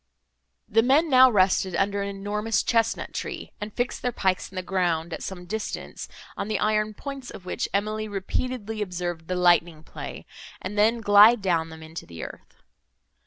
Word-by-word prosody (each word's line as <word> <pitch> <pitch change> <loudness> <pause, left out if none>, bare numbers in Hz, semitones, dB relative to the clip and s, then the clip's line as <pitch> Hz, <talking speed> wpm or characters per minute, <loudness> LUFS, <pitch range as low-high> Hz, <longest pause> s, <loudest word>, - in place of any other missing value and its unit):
The 225 0 +4
men 280 +6 +3
now 260 0 +8
rested 190 -3 +2
under 200 +2 +1
an 200 - -2
enormous 205 +3 -1
chesnut 230 -1 0
tree, - - -5
and 210 +1 -4
fixed 245 +3 -2
their 250 - 0
pikes 190 -5 0
in - - -14
the 185 - -3
ground, 175 -3 0
at - - -5
some 180 -2 -6
distance, 215 +4 -5 0.3
on - - -4
the 215 -1 0
iron 215 0 +1
points 275 -1 -7
of 180 - -10
which - - -2
Emily 215 +2 -1
repeatedly 215 +2 -3
observed 175 -4 -4
the 185 - -1
lightning 175 -3 +3
play, - - -8 0.3
and 190 +3 -6
then 225 +3 +3
glide 210 +2 +7
down 165 -4 +1
them 160 0 -10
into 160 +1 -9
the 85 -2 -8
earth. - - -11
200 Hz, 175 wpm, -25 LUFS, 180-220 Hz, 0.3 s, now